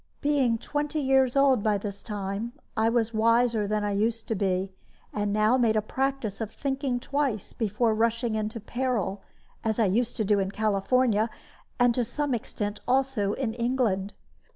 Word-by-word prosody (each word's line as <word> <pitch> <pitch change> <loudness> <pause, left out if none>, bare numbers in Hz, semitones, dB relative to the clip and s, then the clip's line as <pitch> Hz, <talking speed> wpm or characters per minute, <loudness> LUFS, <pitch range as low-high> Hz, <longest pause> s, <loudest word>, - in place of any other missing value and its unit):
Being 275 -6 +2
twenty 295 +5 -2
years 265 -2 +3
old 275 -4 +4
by 210 -1 +2
this 200 0 -6
time, 205 +2 -4 0.2
I 220 0 +3
was 230 -1 +1
wiser 230 -1 +3
than 210 0 0
I 205 - 0
used 220 +3 0
to 225 - +1
be, 190 -1 0 0.4
and 205 -1 -1
now 215 +4 +3
made 230 -3 +3
a 215 - +3
practice 265 -3 -2
of 220 - -2
thinking 270 0 -2
twice 270 -6 -2
before 220 +1 +1
rushing 230 +1 +1
into 215 +1 -2
peril, 225 -4 -2 0.4
as 220 -1 0
I 225 - +3
used 230 +5 0
to 220 - 0
do 205 0 +3
in 190 -1 0
California, 220 +2 +1 0.5
and 245 -1 +5
to 245 - +1
some 280 +4 -2
extent 205 -2 -3
also 255 -6 +1
in 245 -5 -2
England. 235 -5 0
225 Hz, 170 wpm, -27 LUFS, 210-250 Hz, 0.5 s, and